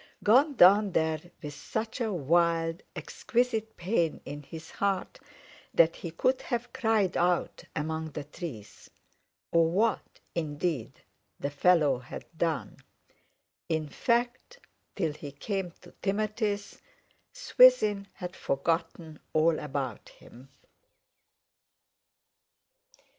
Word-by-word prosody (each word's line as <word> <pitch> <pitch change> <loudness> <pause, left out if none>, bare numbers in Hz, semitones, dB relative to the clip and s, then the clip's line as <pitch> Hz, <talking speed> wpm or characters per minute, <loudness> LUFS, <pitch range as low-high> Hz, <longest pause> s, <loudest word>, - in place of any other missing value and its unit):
Gone 270 +7 +5
down 200 0 +6
there 160 -1 +1 0.2
with 145 -1 -5
such 220 - -4
a 225 -2 0
wild, 165 0 +1
exquisite 225 -2 -1
pain 170 -3 0
in 145 0 -6
his 160 +3 -10
heart 200 -1 -1 0.6
that 165 0 +5
he 170 - -6
could 255 +11 +1
have 240 -2 -3
cried 220 -6 +1
out 175 0 0
among 160 +1 -2
the 150 - -4
trees. 140 - -9 0.6
Or 165 -1 +4
what, 215 +6 0
indeed, 155 -4 -3 0.4
the 140 - -2
fellow 145 -3 +3
had 125 - -9
done. 160 -9 -2 0.9
In 160 -1 0
fact, 240 - -1 0.4
till 165 -6 -1
he 145 -1 -8
came 190 +6 -3
to - - -14
Timothy's, 205 0 -2 0.5
Swithin - - +5
had 180 -1 -7
forgotten 160 +2 -2
all 155 +1 +3
about 135 -6 -4
him. 130 +3 -16
170 Hz, 105 wpm, -29 LUFS, 155-215 Hz, 0.9 s, down